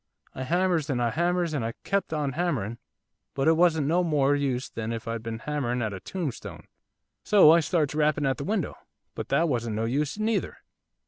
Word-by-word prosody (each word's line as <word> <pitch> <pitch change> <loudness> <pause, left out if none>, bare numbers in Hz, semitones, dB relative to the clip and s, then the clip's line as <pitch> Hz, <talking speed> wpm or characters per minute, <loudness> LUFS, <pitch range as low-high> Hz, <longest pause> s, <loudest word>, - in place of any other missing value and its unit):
I 130 - -5
hammers, 175 -1 +1
and 130 -3 0
I 120 -1 +1
hammers, 175 +2 0
and 140 -6 -1
I 115 +1 -3
kept 200 -3 -1
on 150 -3 -1
hammering, 135 - -2 0.6
but 135 +1 0
it 160 - +6
wasn't 160 -3 +3
no 170 +5 +2
more 145 -4 +2
use 135 -3 -1
than 115 0 -5
if 115 0 -5
I'd 115 -1 -3
been 115 0 -5
hammering 125 -2 -2
at 110 -2 -2
a 95 - -6
tombstone. 165 - -5 0.6
So 195 -7 +7
I 170 - +6
starts 155 -3 0
rapping 150 -1 +1
at 135 -2 +1
the 140 - -4
window, 195 0 -1 0.4
but - - -6
that 170 - +3
wasn't 120 -6 -1
no 110 +1 -1
use 140 - -1
neither. 215 +1 -1
145 Hz, 200 wpm, -27 LUFS, 120-170 Hz, 0.6 s, So